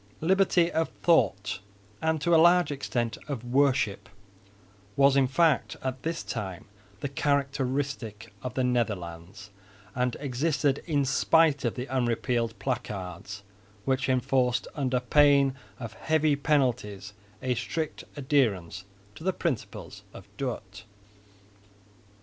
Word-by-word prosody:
Liberty 180 0 +3
of 160 0 0
thought 105 - +2 0.4
and 160 0 +1
to 170 +1 +2
a - - +7
large 175 -2 +5
extent 120 -4 -2
of 135 -6 -4
worship 120 -7 +1 0.9
was 140 0 +5
in 135 -1 +4
fact 160 +3 +2
at 130 -1 -3
this 165 +4 -3
time 95 -3 -5 0.4
the - - -1
characteristic 135 -6 -2
of 125 -1 -5
the 130 - +1
Netherlands, 100 -5 -3 0.4
and 125 -2 -1
existed 140 +1 0
in 145 -4 +1
spite 145 +2 +3
of 120 - 0
the 125 - -4
unrepealed 120 -2 0
placards 100 -6 -5 0.4
which 135 0 0
enforced 130 -1 +1
under 130 -3 0
pain 140 +1 +4 0.3
of 115 -5 -6
heavy 155 +4 +1
penalties 125 -9 0 0.3
a 130 -1 +1
strict 155 +6 -3
adherence 100 - 0 0.3
to 155 - -12
the 190 +1 +1
principles 150 -11 -4
of - - -10
Dort. 105 -7 -5
130 Hz, 120 wpm, -28 LUFS, 115-145 Hz, 0.9 s, a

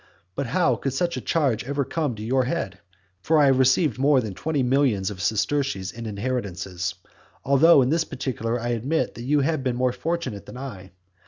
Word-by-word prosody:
But 140 +4 -3
how 135 -5 +2
could 135 +5 -3
such 170 +3 0
a - - -4
charge 140 -9 0
ever 140 +2 -2
come 150 -4 -1
into 105 -1 -8
your 130 +3 +1
head? 125 - -3 0.4
For 160 - +2
I 150 - +6
have 135 -1 +4
received 130 0 +3
more 140 0 +4
than 110 -5 -4
twenty 150 - -1
millions 125 -7 +2
of 95 -3 -7
sesterces 110 - 0
in 115 0 -7
inheritances. 100 -5 -3 0.5
Although 140 +2 +6
in 125 - 0
this 165 +1 +2
particular 120 -5 -3
I 120 +1 -3
admit 125 +7 -1
that - - -9
you 145 +4 +2
have 145 -1 0
been 125 -2 0
more 125 0 +1
fortunate 135 -7 -3
than - - -9
I. 105 -9 -8
130 Hz, 195 wpm, -24 LUFS, 110-145 Hz, 0.5 s, I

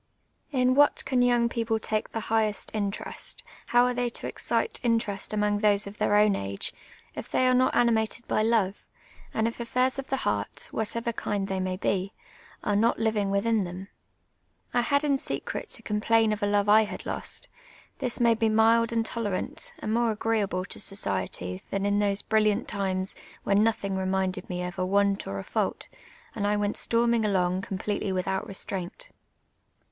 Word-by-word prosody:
In 255 -2 +3
what 290 +2 +4
can 260 -2 +2
young 240 -1 +4
people 230 -1 -1
take 215 -1 -2
the 225 - -4
highest 215 -2 0
interest, 205 -2 -2 0.2
how 245 0 +5
are 250 - +1
they 245 0 0
to - - -5
excite 455 - -1
interest 225 -4 0
among 210 -1 +1
tliose 205 -1 +3
of 200 +1 -9
tlieir 205 0 +4
o\m 210 -2 +3
age, 100 0 -4 0.4
if - - -7
they 255 - +2
are 255 - +4
not 255 +1 +3
animated 235 0 +1
by - - +1
love, 215 -3 +1 0.5
and 220 0 +1
if 230 - -5
affairs 255 +3 +1
of 270 - -5
the 270 - -1
heart, - - -2
of - - -25
whatever 230 +2 -1
kind 200 -2 -2
they 190 -1 -2
may 185 0 -2
be, 195 +1 -1 0.5
are 205 - +1
not 225 +3 +3
living 215 -3 0
within 220 +3 +2
them? 185 +2 -6 0.8
I 245 - +3
had 280 +4 +1
in 280 -2 +2
secret - - -4
to - - -3
com])lain 220 +1 +2
of 210 - -5
a 205 - +1
love 205 0 +2
I 215 +1 +6
had - - -8
lost; - - -1 0.5
this 245 - -1
made 230 -2 +3
mc 220 -1 +3
mild 230 +1 +4
and 230 -1 0
tolerant, 215 -5 -3
and 215 - -3
more 235 0 +2
agreeable 210 -4 0
to - - -6
society 95 - -1
tlian 195 0 -1
in 205 0 +2
those 200 -1 +1
brilliant 215 +1 +2
times 190 -2 -1 0.3
when 200 +1 +3
nothing 200 -3 0
reminded 190 0 -1
me 180 -1 -3
of 180 +1 -5
a - - +1
want 200 +1 +1
or 100 - -4
a 95 - -4
fault, - - -2 0.5
and 205 - -1
I 210 0 +2
went 205 0 0
storming 235 -1 +2
along 185 -3 +1
completely 200 +1 -3
without 190 +1 -1
restraint. 195 - -4
210 Hz, 185 wpm, -27 LUFS, 195-230 Hz, 0.8 s, I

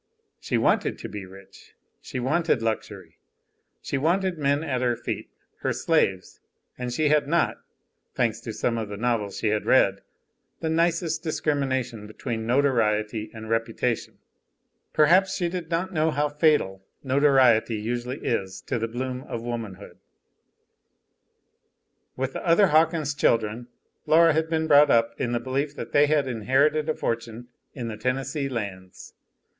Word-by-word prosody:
She - - -1
wanted - - +1
to - - -7
be 100 -2 -7
rich, 95 +1 -16 0.3
she 130 - -6
wanted 140 -1 +1
luxury, 100 -6 -4 0.6
she 140 - -2
wanted 180 +5 +1
men 140 +1 +1
at 130 -5 -2
her 120 -1 +1
feet, 120 - -5 0.3
her - - -1
slaves, - - 0 0.4
and 125 -1 -4
she 150 +4 +1
had 150 -1 +3
not 170 +3 +1 0.6
thanks 115 -3 0
to 120 -1 -6
some 115 +1 -1
of 110 -2 -4
the 100 - -6
novels 115 -3 -1
she 110 - 0
had 105 0 -1
read 100 -7 +4 0.6
the 160 - -2
nicest 165 0 +1
discrimination 130 -8 -2
between 110 +1 -5
notoriety 110 -5 +1
and 110 -1 -9
reputation; 115 +1 -1 0.7
perhaps 185 +5 +4
she 175 - 0
did 175 -2 -5
not 180 +3 -2
know 160 -1 +2
how 150 -1 0
fatal 145 - +1 0.2
notoriety 130 -5 +4
usually 120 +4 -4
is 95 -5 -2
to 125 - -3
the 115 - -1
bloom 125 +2 -4
of 115 - -5
womanhood. 115 -5 -6 2.2
With 130 0 -3
the - - -5
other 185 +3 +4
Hawkins 155 -1 +2
children 115 -3 0 0.4
Laura 165 0 +6
had 160 +1 0
been 160 -1 0
brought 150 -1 +6
up 115 0 +3
in 120 - -1
the 120 - 0
belief 140 +4 -2
that - - -7
they 145 +1 +5
had 145 -2 +2
inherited 140 +6 +1
a 155 - +1
fortune 115 +1 -4 0.3
in 120 -4 -4
the 110 -2 -5
Tennessee 135 +4 -2
Lands. 100 -6 -6
130 Hz, 150 wpm, -25 LUFS, 115-150 Hz, 2.2 s, Laura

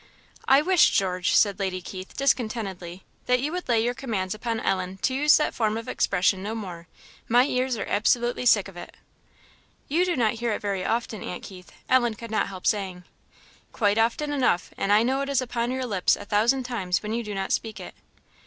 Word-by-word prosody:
"I 270 +2 +6
wish, 365 0 +5
George," 185 -2 0
said 200 -2 +3
Lady 190 -2 -2
Keith, 185 +1 -9
discontentedly, 210 -9 -2 0.2
"that 250 0 +3
you 285 +4 -2
would 360 -4 -5
lay 225 -2 +3
your 240 +1 0
commands 215 -8 -3
upon 225 +1 -3
Ellen 185 -1 -2
to 260 - +2
use 295 +3 +5
that 300 - 0
form 220 -1 0
of 230 - -7
expression 185 +1 +1
no 215 +3 -4
more. 180 -6 -7 0.4
My 245 +2 +5
ears 255 -2 -1
are 210 - -3
absolutely 240 +4 +1
sick 205 -4 +4
of 195 - -13
it." 175 - -10 0.9
"You 330 +5 +2
do 360 -1 0
not 230 -4 +2
hear 235 -1 -2
it - - -3
very 200 -2 -2
often, 225 -2 -2
aunt 180 - -6
Keith," 180 -2 -11 0.2
Ellen 240 -3 +3
could 230 0 -9
not 220 - +1
help 190 -2 -9
saying. 190 -4 -1 0.7
"Quite 205 -1 +1
often 240 +6 +1
enough; 250 -11 +1
and 195 - -1
I 210 +2 +5
know 265 +3 0
it 275 - -3
is 275 -2 +2
upon 240 -2 -2
your 260 0 -2
lips 195 -6 +2
a - - -10
thousand 230 +6 +2
times 200 -8 -2
when 210 +1 -3
you 235 +1 -2
do 210 -2 -6
not 195 0 -3
speak 220 -3 -2
it." 180 - -9
220 Hz, 210 wpm, -25 LUFS, 195-250 Hz, 0.9 s, I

